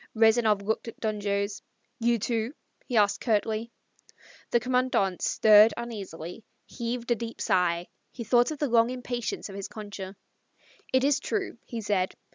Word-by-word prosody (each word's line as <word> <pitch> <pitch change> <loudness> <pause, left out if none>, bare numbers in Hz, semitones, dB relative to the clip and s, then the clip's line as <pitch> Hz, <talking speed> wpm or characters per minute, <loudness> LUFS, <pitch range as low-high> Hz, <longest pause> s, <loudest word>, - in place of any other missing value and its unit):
Rezanov 220 -2 +4
looked 220 +3 -2
at 230 - -8
Don 215 -2 -2
Jose. 200 0 -1 0.4
"You, 235 0 +2
too?" 230 +4 -2 0.3
he 245 - 0
asked 205 -1 +3
curtly. 220 0 0 0.8
The 240 - +3
Commandante 250 -6 +1
stirred 215 +1 +6
uneasily, 205 -5 -7 0.2
heaved 240 0 -4
a - - +5
deep 230 0 -6
sigh; 180 -4 +1 0.2
he 235 - -6
thought 240 +2 +4
of 310 - -4
the 290 - 0
long 235 -1 +4
impatience 245 -2 -4
of 200 - -10
his 195 -1 -5
Concha. 205 -2 -8 0.8
"It 260 0 +3
is 280 0 +3
true," 390 - -3
he 230 -2 -5
said. 200 -3 0
225 Hz, 155 wpm, -27 LUFS, 205-240 Hz, 0.8 s, stirred